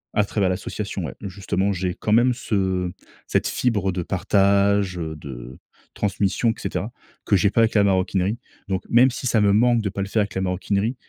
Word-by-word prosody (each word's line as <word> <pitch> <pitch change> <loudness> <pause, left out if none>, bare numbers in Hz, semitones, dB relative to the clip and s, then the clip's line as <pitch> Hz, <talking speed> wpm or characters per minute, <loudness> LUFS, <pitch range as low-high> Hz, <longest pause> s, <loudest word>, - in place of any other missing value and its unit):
À 105 -1 +3
travers 100 -1 0
l'association, 90 - -4
ouais, - - -7
justement, 95 0 -1
j'ai 90 -1 -2
quand 105 - -3
même 120 +3 +4
ce 95 -7 -1 0.3
cette - - 0
fibre 105 -6 0
de 90 -1 -3
partage, 100 0 +2
heu, 80 -1 -4
de 65 -3 -9 0.4
transmission 100 +3 0
et - - -3
cetera - - -3 0.3
que - - +3
j'ai 95 +1 +3
pas 115 - +2
avec 115 - +2
la 105 - +4
maroquinerie. 95 +2 +1 0.3
Donc, 95 -1 -2
même 125 +3 +6
si 125 -1 -6
ça 115 -3 +2
me 100 -1 +4
manque 120 +2 +4
de 105 - -2
pas 100 +1 -4
le 100 - -2
faire 110 +2 +1
avec 105 - -3
la 95 - -1
maroquinerie, 100 +5 -1
100 Hz, 200 wpm, -23 LUFS, 95-105 Hz, 0.4 s, même